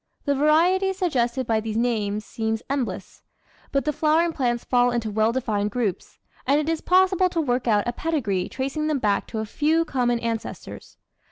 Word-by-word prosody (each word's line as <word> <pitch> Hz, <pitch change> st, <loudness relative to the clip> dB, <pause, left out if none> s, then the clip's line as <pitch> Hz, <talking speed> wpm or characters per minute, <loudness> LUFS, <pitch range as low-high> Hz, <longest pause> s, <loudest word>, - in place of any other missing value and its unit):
The 285 Hz, -, +2 dB
variety 340 Hz, +7 st, +3 dB
suggested 260 Hz, -9 st, 0 dB
by 225 Hz, -1 st, +1 dB
these 220 Hz, 0 st, -4 dB
names 215 Hz, -3 st, -1 dB
seems 220 Hz, 0 st, -3 dB
endless, 220 Hz, -10 st, -4 dB, 0.5 s
but 275 Hz, -3 st, 0 dB
the 300 Hz, -, 0 dB
flowering 320 Hz, +3 st, +2 dB
plants 240 Hz, -4 st, -1 dB
fall 245 Hz, -1 st, +3 dB
into 235 Hz, -3 st, -2 dB
well 220 Hz, +2 st, +2 dB
defined 215 Hz, -5 st, -1 dB
groups, 210 Hz, -5 st, -3 dB, 0.3 s
and 280 Hz, +2 st, +4 dB
it 305 Hz, -, -2 dB
is 325 Hz, -1 st, -1 dB
pos 370 Hz, +1 st, +4 dB
sible 370 Hz, -1 st, +2 dB
to 345 Hz, -, -2 dB
work 250 Hz, -5 st, 0 dB
out 210 Hz, -1 st, +2 dB
a 240 Hz, -, -1 dB
pedigree 235 Hz, -, -1 dB
tracing 275 Hz, +4 st, -3 dB
them 305 Hz, -2 st, +1 dB
back 210 Hz, -5 st, 0 dB
to 225 Hz, -, -6 dB
a 220 Hz, -, -2 dB
few 315 Hz, +8 st, +1 dB
common 245 Hz, -4 st, 0 dB
ancestors. 230 Hz, -1 st, -6 dB
245 Hz, 185 wpm, -24 LUFS, 220-305 Hz, 0.5 s, and